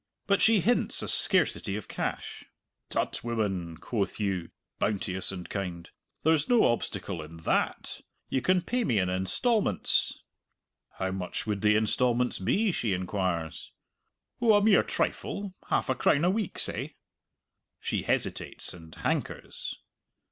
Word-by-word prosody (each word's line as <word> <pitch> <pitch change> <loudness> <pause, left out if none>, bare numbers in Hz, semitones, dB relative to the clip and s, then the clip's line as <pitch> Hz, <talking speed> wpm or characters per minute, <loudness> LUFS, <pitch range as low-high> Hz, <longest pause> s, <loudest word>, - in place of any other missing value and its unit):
But 200 -1 +2
she 220 -3 +6
hints 240 +8 +3
a - - -3
scarcity 160 - +2
of 105 - -6
cash. - - -4 0.4
"Tut, - - -1
woman!" 95 -8 -2
quoth 110 -3 -2
you, 95 -5 -1 0.3
bounteous 95 -3 0
and 90 -2 -6
kind, 90 -4 -5 0.3
"there's 160 -1 +3
no 240 -2 +5
obstacle 100 -6 -1
in 80 +2 -10
that! 80 - -1 0.3
You 130 - 0
can 185 +2 +2
pay 245 +5 0
me 120 - +1
in 90 -2 +1
instalments!" 105 - +1 0.7
How 95 0 -2
much 95 +1 -4
would 105 -2 -2
the 105 0 +4
instalments 120 +3 +1
be, 200 - +2
she 115 - 0
inquires. 90 -3 -2 0.7
"Oh, 230 -2 +6
a 205 - +4
mere 215 -2 +6
trifle 200 -2 -2 0.2
half - - +1
a 130 - +2
crown 145 +4 +3
a 180 - +4
week, 210 -2 -2
say." - - -2 0.8
She - - -1
hesitates - - -1
and 80 -2 -12
hankers. - - -3
105 Hz, 140 wpm, -29 LUFS, -, 0.8 s, she